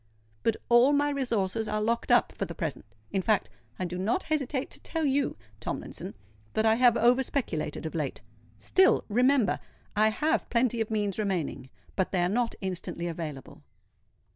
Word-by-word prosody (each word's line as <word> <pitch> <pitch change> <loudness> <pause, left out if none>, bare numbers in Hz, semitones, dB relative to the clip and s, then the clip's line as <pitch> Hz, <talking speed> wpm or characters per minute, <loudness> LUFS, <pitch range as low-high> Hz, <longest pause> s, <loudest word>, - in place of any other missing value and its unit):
But 225 - +1
all 240 +4 +6
my 290 0 +2
resources 225 -6 -1
are 215 0 -1
locked 230 +2 0
up - - +4
for - - -2
the - - -8
present:—in 195 - -4
fact, 195 - +1 0.3
I 185 - -2
do 180 +1 -4
not 220 - 0
hesitate 285 -4 -1
to - - -9
tell 325 -2 -2
you, 275 0 +1 0.2
Tomlinson, - - -5 0.4
that 220 - +1
I 220 - +6
have 240 0 +5
over 245 +3 +4
speculated 160 - -2
of 160 - -4
late. 150 -5 -3 0.4
Still—remember—I 245 - +2
have 310 +9 0
plenty 235 -1 +1
of 220 - -1
means 210 -2 -1
remaining; 180 -10 -2 0.3
but 190 - 0
they 180 -2 +2
are 175 - +2
not 235 +3 0
instantly 180 -2 -4
available." 160 -5 -6
220 Hz, 160 wpm, -28 LUFS, 185-255 Hz, 0.4 s, all